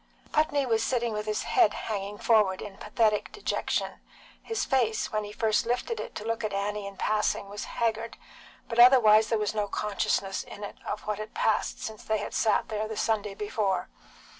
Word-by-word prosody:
Putney 295 -2 +2
was 225 -3 +1
sitting 235 -1 0
with 210 0 -4
his 215 - -1
head 210 - +3
hanging 205 -1 -4
forward 210 -5 +3
in 200 -2 -8
pathetic 215 -3 +1
dejection; 420 - -2 0.4
his 450 -1 -2
face, 235 -5 +1
when 215 -1 -1
he 205 - -7
first 220 +1 +1
lifted 250 - -1
it - - -6
to 210 - -6
look 230 0 -2
at 210 -1 -2
Annie 205 0 -2
in 195 -1 -10
passing, 210 -1 0
was 205 +1 -5
haggard, 230 0 -2 0.5
but 235 0 -2
otherwise 220 -4 +7
there 225 - +2
was 210 0 -1
no 210 -1 -1
consciousness 200 -1 -1
in 205 - -10
it 205 - -7
of 210 - -3
what 210 -1 -2
had 215 - -7
passed 485 +3 +1
since 220 -1 -6
they 220 - 0
had 210 - -5
sat 215 -3 +2
there 215 0 -2
the 220 -1 -6
Sunday 210 -3 0
before. 200 -3 -1
215 Hz, 190 wpm, -28 LUFS, 205-230 Hz, 0.5 s, otherwise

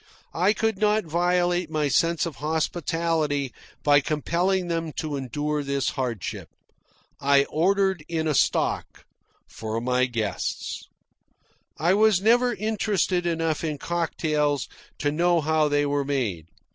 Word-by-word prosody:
I 185 +5 +3
could 220 -3 -1
not 210 -1 +2
violate 175 +1 +1
my 155 -2 0
sense 165 +4 +2
of 165 - -6
hospitality 155 -2 -1 0.3
by 145 -1 +6
compelling 175 +5 0
them 165 -2 -2
to 150 0 -3
endure 145 +3 -2
this 140 -1 -1
hardship. 120 -6 -4 0.7
I 140 0 +4
ordered 190 +2 +1
in 160 -1 -1
a 155 - +1
stock - - 0 0.4
for 110 0 -4
my 125 +1 +1
guests. 115 -4 -3 0.9
I 170 +4 +2
was 215 -2 +4
never 240 +4 +4
interested 200 -4 0
enough 165 -2 -1
in 155 -2 -2
cocktails 150 -3 -1 0.3
to 145 - 0
know 170 +2 +2
how 155 0 +2
they 145 0 +1
were 145 0 0
made. 120 - -2
160 Hz, 130 wpm, -25 LUFS, 145-175 Hz, 0.9 s, by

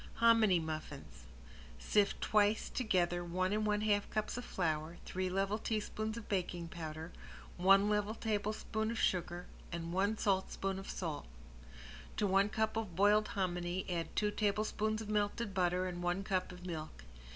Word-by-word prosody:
~HOMINY 225 -6 +5
MUFFINS~ 155 - -6 0.5
Sift 200 - +2
twice 210 0 +3
together 175 -7 +1
one 185 +3 0
and 215 0 +1
one 210 0 +1
half 205 -1 +2
cups 215 0 -2
of 245 - -4
flour, 160 -5 -2
three 185 0 -2
level 195 +3 0
teaspoons 215 0 -2
of 230 - -8
baking 175 -3 -2
powder, 160 0 -6 0.5
one 195 +3 +6
level 210 +1 +1
tablespoon 220 0 -1
of 230 - -2
sugar, 175 -2 0 0.3
and 170 0 -4
a 200 +4 +2
saltspoon 195 -1 0
of 195 - -8
salt. 160 - -4 0.9
To - - +2
one 195 +1 +4
cup 220 +1 0
of 210 -7 -3
boiled 210 +3 +4
hominy 175 -1 -1
add 170 -2 -3
two 210 0 +2
tablespoons 215 +1 0
of 210 - -9
melted 210 +1 0
butter 180 -1 +1
and 175 -1 -4
one 175 +2 0
cup 185 -2 -1
of 180 0 -10
milk. 155 - -6
195 Hz, 155 wpm, -35 LUFS, 175-215 Hz, 0.9 s, one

